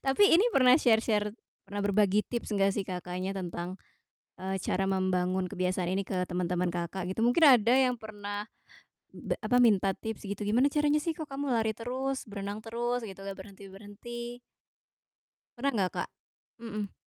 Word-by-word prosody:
Tapi 405 Hz, +10 st, +5 dB
ini 375 Hz, +8 st, +6 dB
pernah 255 Hz, -1 st, +7 dB
share-share 220 Hz, -4 st, +2 dB, 0.3 s
pernah 205 Hz, 0 st, -4 dB
berbagi 205 Hz, 0 st, +3 dB
tips 235 Hz, -3 st, -4 dB
gak 195 Hz, 0 st, +3 dB
sih 200 Hz, -3 st, -2 dB
Kakaknya 180 Hz, +1 st, -4 dB
tentang, 175 Hz, -1 st, -4 dB, 0.6 s
eee, 190 Hz, 0 st, -3 dB
cara 195 Hz, +1 st, 0 dB
membangun 185 Hz, -1 st, 0 dB
kebiasaan 180 Hz, 0 st, -1 dB
ini 195 Hz, +1 st, -1 dB
ke 180 Hz, -1 st, -1 dB
teman-teman 180 Hz, 0 st, 0 dB
Kakak 175 Hz, +1 st, -3 dB
gitu? 225 Hz, +5 st, 0 dB
Mungkin 280 Hz, +7 st, +5 dB
ada 245 Hz, -4 st, +6 dB
yang 255 Hz, -1 st, +3 dB
pernah 205 Hz, -2 st, -6 dB, 0.7 s
be -, -, -3 dB
apa, 245 Hz, 0 st, +4 dB
minta 200 Hz, -5 st, +4 dB
tips 220 Hz, +2 st, -6 dB
gitu, 200 Hz, +1 st, -5 dB
"Gimana 240 Hz, +7 st, +3 dB
caranya 295 Hz, 0 st, +3 dB
sih 325 Hz, +2 st, -2 dB
kok 310 Hz, -2 st, -7 dB
kamu 275 Hz, -1 st, -2 dB
lari 220 Hz, -1 st, +1 dB
terus, 260 Hz, +3 st, -3 dB
berenang 200 Hz, 0 st, -5 dB
terus" 240 Hz, +1 st, -2 dB
gitu, 195 Hz, -2 st, -9 dB
"gak 195 Hz, -1 st, -6 dB
berhenti-berhenti?" 205 Hz, +5 st, -9 dB, 1.2 s
Pernah 275 Hz, +3 st, +1 dB
enggak, 195 Hz, -7 st, 0 dB
Kak? -, -, -7 dB, 0.5 s
Mhm. 215 Hz, -3 st, -5 dB
205 Hz, 160 wpm, -30 LUFS, 190-240 Hz, 1.2 s, pernah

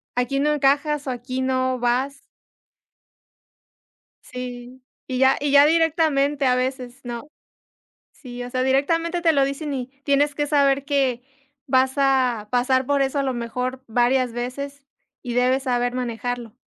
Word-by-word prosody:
aquí 250 Hz, +3 st, 0 dB
no 300 Hz, +2 st, +2 dB
encajas 290 Hz, +1 st, +1 dB
o -, -, 0 dB
aquí 255 Hz, +1 st, -4 dB
no 260 Hz, -1 st, 0 dB
vas". 255 Hz, +4 st, -1 dB, 2.0 s
Sí, 250 Hz, 0 st, -8 dB, 0.3 s
y 255 Hz, -, -3 dB
ya 265 Hz, +1 st, +4 dB
y 290 Hz, 0 st, -1 dB
ya 285 Hz, 0 st, +7 dB
directamente 300 Hz, -3 st, +2 dB
a 250 Hz, -1 st, +3 dB
veces, 255 Hz, 0 st, -3 dB
¿no? 240 Hz, +2 st, -6 dB, 0.9 s
Sí, 245 Hz, -3 st, -9 dB
o 245 Hz, -, -7 dB
sea, 255 Hz, 0 st, -1 dB
directamente 330 Hz, +6 st, +1 dB
te 335 Hz, -1 st, +3 dB
lo 280 Hz, -2 st, +3 dB
dicen 280 Hz, +2 st, -4 dB
y 255 Hz, -2 st, -4 dB, 0.2 s
tienes 285 Hz, +1 st, +2 dB
que 295 Hz, +1 st, -1 dB
saber 280 Hz, -2 st, +2 dB
que 270 Hz, -4 st, 0 dB, 0.4 s
vas 260 Hz, -1 st, +2 dB
a 260 Hz, -6 st, +1 dB
pasar 255 Hz, +1 st, +1 dB
por 280 Hz, 0 st, +2 dB
eso 270 Hz, +1 st, -1 dB
a -, -, +1 dB
lo 265 Hz, -2 st, -1 dB
mejor 250 Hz, +2 st, -4 dB
varias 245 Hz, +2 st, +1 dB
veces, 275 Hz, +4 st, -5 dB, 0.4 s
y 245 Hz, -2 st, -5 dB
debes 255 Hz, +2 st, +2 dB
saber 245 Hz, -1 st, 0 dB
manejarlo. 245 Hz, -1 st, -4 dB
260 Hz, 150 wpm, -22 LUFS, 250-280 Hz, 2.0 s, ya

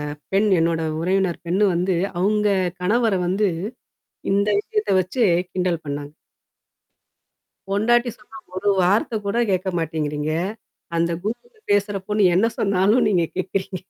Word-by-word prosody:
அந்த 145 Hz, -, -33 dB
பெண் 210 Hz, +2 st, +3 dB
என்னோட 165 Hz, 0 st, +1 dB, 0.2 s
உறவினர் 180 Hz, -1 st, 0 dB
பெண்ணு 190 Hz, +5 st, +2 dB
வந்து 180 Hz, +2 st, +1 dB, 0.3 s
அங்க 210 Hz, +1 st, +2 dB, 0.3 s
கணவர 225 Hz, +4 st, +2 dB
வந்து 195 Hz, +3 st, +1 dB, 0.8 s
இந்த 200 Hz, +1 st, +2 dB
விஷயத்த 425 Hz, -, -2 dB
வச்சு 185 Hz, +8 st, -2 dB, 0.3 s
கிண்டல் 180 Hz, -3 st, -1 dB
பண்ணாங்க. 145 Hz, 0 st, -5 dB, 1.6 s
பொண்டாட்டி 240 Hz, +5 st, +2 dB
சொன்னா 220 Hz, -, -14 dB, 0.2 s
ஒரு 200 Hz, +2 st, 0 dB
வார்த்த 205 Hz, +5 st, +2 dB
கூட 200 Hz, +3 st, -1 dB
கேட்க 185 Hz, +1 st, 0 dB
மாட்டேங்கிறீங்க. 150 Hz, -2 st, -2 dB, 0.6 s
அந்த 170 Hz, 0 st, +1 dB
கூகில்ல 440 Hz, -, -5 dB
பேசுறப் 200 Hz, -1 st, 0 dB
பொண்ணு 210 Hz, -3 st, +4 dB
என்ன 220 Hz, +5 st, +3 dB
சொன்னாலும் 200 Hz, +4 st, +3 dB
நீங்க 175 Hz, -5 st, +2 dB
கேட்கிறீங்க? 185 Hz, 0 st, -3 dB
195 Hz, 125 wpm, -22 LUFS, 175-210 Hz, 1.6 s, பொண்ணு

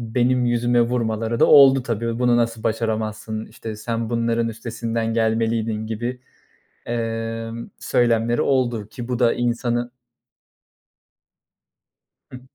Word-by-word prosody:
benim 125 Hz, +2 st, +1 dB
yüzüme 120 Hz, 0 st, +2 dB
vurmaları 115 Hz, -1 st, -1 dB
da -, -, +6 dB
oldu 135 Hz, -2 st, +7 dB
tabii. 115 Hz, -1 st, -2 dB
"Bunu 125 Hz, -1 st, +3 dB
nasıl 115 Hz, -2 st, 0 dB
başaramazsın? 110 Hz, -1 st, -2 dB
İşte, 110 Hz, -1 st, -8 dB
sen 115 Hz, +1 st, -3 dB
bunların 115 Hz, 0 st, 0 dB
üstesinden 115 Hz, 0 st, -3 dB
gelmeliydin." 110 Hz, -1 st, 0 dB
gibi, 120 Hz, +3 st, -4 dB, 0.7 s
emm, 115 Hz, 0 st, -4 dB
söylemleri 120 Hz, -1 st, +1 dB
oldu, 120 Hz, -6 st, 0 dB
ki 120 Hz, +3 st, -8 dB
bu 125 Hz, -, -1 dB
da 120 Hz, -2 st, +4 dB
insanı 120 Hz, 0 st, -1 dB, 2.4 s
Hıı. 125 Hz, -, -9 dB
115 Hz, 110 wpm, -22 LUFS, 115-120 Hz, 2.4 s, oldu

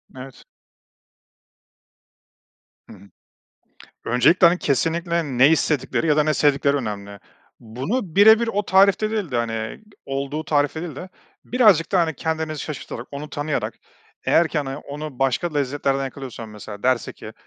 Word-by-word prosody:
Evet. 130 Hz, 0 st, -11 dB, 2.4 s
Hı -, -, -11 dB
hı. 100 Hz, +1 st, -18 dB, 1.0 s
Öncelikle, 135 Hz, +10 st, +4 dB
hani, 175 Hz, +1 st, +3 dB
kesinlikle 170 Hz, +4 st, 0 dB, 0.2 s
ne 130 Hz, +3 st, +7 dB
istedikleri 160 Hz, -1 st, +1 dB
ya 150 Hz, -2 st, +3 dB
da 150 Hz, -, +4 dB
ne 155 Hz, -, +1 dB
sevdikleri 140 Hz, 0 st, +2 dB
önemli. 100 Hz, -5 st, -5 dB, 0.4 s
Bunu 155 Hz, -, -4 dB
bire 220 Hz, +2 st, +7 dB
bir 235 Hz, -, -1 dB
o 205 Hz, -2 st, 0 dB
tarifte 200 Hz, +3 st, +4 dB
değil 210 Hz, -7 st, -3 dB
de, 125 Hz, -, -2 dB
hani, 115 Hz, -2 st, -3 dB, 0.3 s
olduğu 140 Hz, +3 st, -3 dB
tarifte 145 Hz, +2 st, 0 dB
değil 165 Hz, -6 st, -7 dB
de 180 Hz, -, -8 dB, 0.4 s
birazcık 210 Hz, -10 st, +3 dB
da, 185 Hz, -, +4 dB
hani, 160 Hz, -2 st, 0 dB
kendinizi 160 Hz, +1 st, -3 dB
şaşırtarak, 130 Hz, -5 st, -7 dB
onu 145 Hz, +2 st, -7 dB
tanıyarak, 145 Hz, -7 st, -3 dB, 0.5 s
eğer 165 Hz, 0 st, +3 dB
ki, 155 Hz, -, -2 dB
hani, 135 Hz, -2 st, -4 dB
onu 145 Hz, -2 st, -8 dB
başka 135 Hz, +6 st, 0 dB
lezzetlerden 140 Hz, -1 st, -1 dB
yakalıyorsam, 130 Hz, -4 st, -8 dB
mesela 105 Hz, -1 st, -10 dB
derse 130 Hz, -2 st, +1 dB
ki, -, -, -11 dB
145 Hz, 145 wpm, -22 LUFS, 130-170 Hz, 2.4 s, ne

